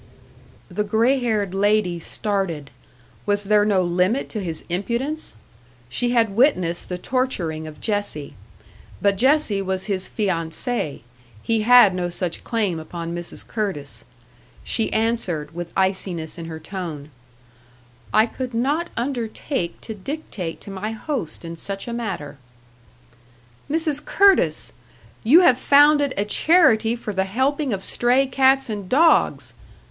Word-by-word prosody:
The 200 +3 -2
grey 230 +6 +2
haired 215 -6 -1
lady 200 -3 +1
started 180 -6 -2 0.6
was 205 0 +2
there 210 +1 +4
no 200 -3 +2
limit 180 +9 +1
to 215 - -4
his 165 -3 -4
impudence? 235 - -3 0.5
She 240 - 0
had 225 -4 +2
witnessed 185 - +2
the 180 - -3
torturing 180 -10 -2
of 155 -1 -11
Jessie. 205 -9 -2 0.7
But 200 -1 +2
Jessie 260 -3 +2
was 190 -1 -2
his 190 -3 -2
fiancée; 170 - -2 0.4
he 225 -1 +1
had 235 -3 +7
no 180 -1 -2
such 175 -1 -3
claim 205 -8 -1
upon 170 +1 -6
Mrs. 175 0 -7
Curtis. 145 - -4 0.6
She 225 - 0
answered, 195 -10 -1
with 175 0 -6
iciness 185 -4 -1
in 165 - -6
her 160 -1 -7
tone: 160 -4 -7 1.0
"I 215 - +5
could 250 0 -6
not 290 +9 0
undertake 235 - -3
to 220 - -6
dictate 205 - -6
to 200 - -8
my 205 +3 -4
host 220 - -4
in 165 0 -6
such 195 +6 -5
a 235 - -4
matter." 185 -12 -5 1.3
"Mrs. 305 -1 0
Curtis! 395 -1 +3 0.5
You 290 +11 +7
have 260 -8 +5
founded 290 0 +5
a 200 - +1
charity 230 - +4
for 220 -3 -6
the 190 0 0
helping 265 +7 0
of 195 -2 -3
stray 250 +3 +2
cats 270 0 +3
and 205 -4 -5
dogs!" 320 +5 +3
205 Hz, 135 wpm, -22 LUFS, 175-245 Hz, 1.3 s, had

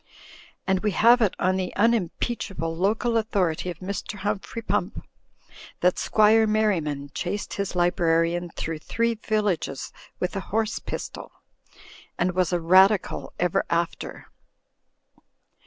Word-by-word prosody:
And 190 -1 +2
we 210 0 -1
have 240 +2 +6
it 210 -5 +2
on 185 +1 +1
the 185 -1 -3
unimpeachable 200 -5 0
local 220 +6 +1
authority 185 -6 0
of 175 - -6
Mr. 200 +2 -4
Humphrey 205 +2 -4
Pump - - -1 0.8
that 180 0 +3
Squire 220 +1 +4
Merriman 165 -10 0
chased 200 +3 -3
his 200 -2 -3
librarian 175 0 +1
through 160 -1 -4
three 230 +8 0
villages 210 -10 -2 0.3
with 180 +1 -2
a - - -1
horse 220 +1 0
pistol; - - -7 0.9
and 180 +1 +1
was 180 -1 0
a 175 - +1
Radical 190 +4 +3
ever 175 -1 +1
after. 170 0 -2
190 Hz, 125 wpm, -25 LUFS, 175-215 Hz, 0.9 s, have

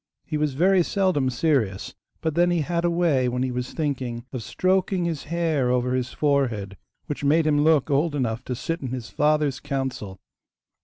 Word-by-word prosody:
He 155 - -4
was 150 -3 0
very 185 +4 +4
seldom 180 -8 +1
serious, 120 - 0 0.3
but 160 - -1
then 175 +3 +3
he 175 -2 +1
had 170 +3 -1
a 175 - +3
way 165 -7 +2
when 125 +1 -1
he 130 - -1
was 125 0 -4
thinking 130 -6 -3
of 130 - -3
stroking 185 - 0
his 165 -4 -3
hair 160 -5 0
over 125 0 +1
his 130 -1 -1
forehead, 120 -9 0 0.3
which 145 - -5
made 155 +3 +3
him 145 -1 +3
look 155 -2 +3
old 145 +2 +1
enough 120 -3 -1
to 125 - -3
sit 165 +7 -3
in 135 - -4
his 120 -6 -6
father's 150 0 +1
council! 130 -9 -4
145 Hz, 190 wpm, -24 LUFS, 125-165 Hz, 0.3 s, very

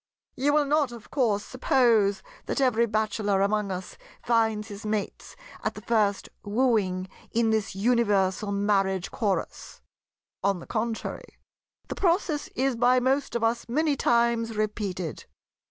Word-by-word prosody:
"You 285 +3 +1
will 300 -1 +3
not, 290 -2 +1
of 235 -2 -12
course, 220 -7 +1
suppose 230 -6 +2 0.2
that - - -1
every 235 -3 +3
bachelor 210 -2 0
among 205 0 0
us 185 0 -6 0.2
finds 220 -2 +1
his 205 0 -8
mates 210 -1 -4 0.3
at - - -2
the - - -8
first 210 -4 +1 0.2
wooing 205 -5 +1 0.2
in 225 -1 +2
this 215 -3 -1
universal 205 -3 +1
Marriage 195 -2 0
Chorus. 205 -4 -3 0.6
On 195 -2 +1
the - - -10
contrary, 225 0 -4 0.5
the - - -4
process 340 -5 0
is 265 0 +1
by 245 +2 +4
most 265 +2 0
of 235 - -1
us 235 +1 0
many 300 +3 +1
times 235 -3 +1
repeated. 200 -6 -3
220 Hz, 140 wpm, -26 LUFS, 200-245 Hz, 0.6 s, by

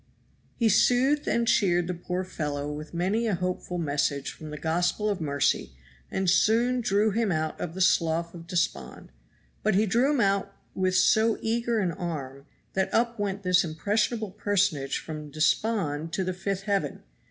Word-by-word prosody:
He 230 - +2
soothed 250 +7 +3
and 235 0 +1
cheered 175 -6 +3
the 180 - -2
poor 180 +1 -3
fellow 150 -5 -4
with 150 +1 -7
many 195 +7 0
a 210 - +1
hopeful 180 0 -3
message 145 -3 -1
from 155 - -10
the 150 - -6
gospel 175 +7 0
of 195 - -3
mercy 140 - 0 0.4
and 190 0 -2
soon 230 +8 +3
drew 210 0 +2
him 220 -1 0
out 155 -1 -2
of 170 0 -4
the 190 - -3
Slough 170 -1 +2
of 170 -1 -10
Despond; 165 - -2 0.5
but 215 -2 +1
he 210 +3 +4
drew 235 +7 +2
him 295 -3 +1
out 195 -2 +1 0.2
with 185 -1 0
so 220 +4 +4
eager 230 +1 0
an 190 -5 +1
arm 145 -5 -6 0.3
that 190 0 0
up 235 0 +1
went 200 -1 -2
this 180 -1 +4
impressionable 210 +6 -1
personage 190 -9 0
from 155 -2 -7
despond 160 0 0
to 190 - 0
the 185 0 -2
fifth 195 +1 -3
heaven. 195 -8 -1
185 Hz, 170 wpm, -27 LUFS, 160-215 Hz, 0.5 s, he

